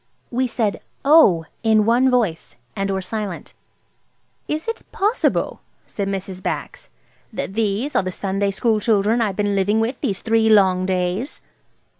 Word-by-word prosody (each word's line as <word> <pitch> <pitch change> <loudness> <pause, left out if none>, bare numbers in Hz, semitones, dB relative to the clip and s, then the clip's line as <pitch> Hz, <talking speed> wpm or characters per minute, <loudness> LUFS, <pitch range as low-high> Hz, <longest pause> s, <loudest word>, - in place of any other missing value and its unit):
We 255 +1 0
said, 220 -4 -1 0.2
"Oh!" 275 - +6 0.2
in 220 -2 +3
one 245 +3 +4
breath, 225 -10 -1 0.2
and 195 0 -2
were 190 -1 -2
silent. 205 -2 -5 0.9
"Is 310 +5 -3
it 455 - -3
possible," 425 +5 0 0.2
said 200 -2 -4
Mrs. 190 -1 -5
Bax, - - -5 0.4
"that - - -5
these 220 +6 -1
are - - +4
the 185 -1 -4
Sunday 195 +2 -1
school 215 +2 +1
children 215 +1 +2
I've 205 -4 0
been 205 0 0
living 200 +2 +1
with 235 +4 -2
these 195 -2 -2
three 225 0 +2
long 190 -3 +4
days?" 185 - -2
210 Hz, 150 wpm, -21 LUFS, 195-235 Hz, 0.9 s, Oh